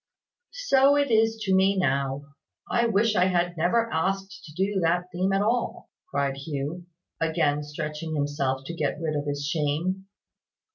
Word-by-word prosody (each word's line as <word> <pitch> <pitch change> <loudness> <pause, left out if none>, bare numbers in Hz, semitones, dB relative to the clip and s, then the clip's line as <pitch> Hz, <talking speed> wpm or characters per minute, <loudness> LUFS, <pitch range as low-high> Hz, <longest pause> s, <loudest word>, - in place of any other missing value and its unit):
"So 275 - +5
it 285 -3 +1
is 225 0 +3
to 195 -2 +1
me 190 +1 +4
now. 140 -4 0 0.4
I 235 0 +2
wish 220 0 +2
I 180 - +4
had 175 -1 +1
never 180 +8 +2
asked 195 +4 -2
to 155 - -12
do 195 +2 0
that 175 +1 +1
theme 185 +2 0
at 195 +1 +2
all," 235 +3 -1 0.2
cried 140 -1 -1
Hugh, 150 +4 -5 0.3
again 160 -3 +1
stretching 150 +2 -5
himself 140 -2 -1
to 170 - -5
get 155 -2 -2
rid 160 -2 -2
of 145 0 -2
his 145 0 -2
shame. 165 +6 -1
175 Hz, 160 wpm, -26 LUFS, 145-195 Hz, 0.4 s, So